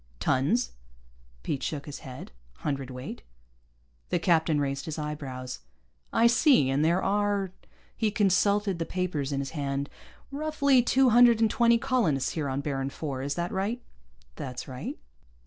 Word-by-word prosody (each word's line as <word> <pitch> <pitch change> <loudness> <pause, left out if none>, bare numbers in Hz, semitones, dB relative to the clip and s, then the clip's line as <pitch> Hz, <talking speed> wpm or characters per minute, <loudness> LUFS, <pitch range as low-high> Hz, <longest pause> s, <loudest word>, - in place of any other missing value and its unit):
"Tons?" 150 - +1 0.7
Pete 140 - -2
shook 145 +1 -3
his 145 - -7
head. 130 - -9 0.3
"Hundredweight." 135 -3 -4 0.9
The - - +1
captain 160 -3 +2
raised 140 -1 -2
his 160 -1 -5
eyebrows. 140 -4 -5 0.5
"I 230 - +3
see. 235 - +5
And 140 +3 +2
there 170 +4 +2
are 200 -1 +1 0.2
" - - -32
he 220 -2 +1
consulted 200 -1 +2
the 165 - -1
papers 165 -7 -2
in 140 -1 -1
his 135 - -5
hand 140 -2 -3 0.4
"roughly 280 -3 +2
two 255 +1 +3
hundred 240 -1 +7
and 225 -2 +3
twenty 235 -1 +4
colonists 230 - +1
here 150 -4 -2
on 135 +1 -2
Baron 135 -2 -2
IV. 135 -1 -4
Is 140 +1 -2
that 175 +1 -2
right?" 205 +6 -1 0.6
"That's 125 -1 -6
right." 130 -1 -6
160 Hz, 150 wpm, -28 LUFS, 140-215 Hz, 0.9 s, hundred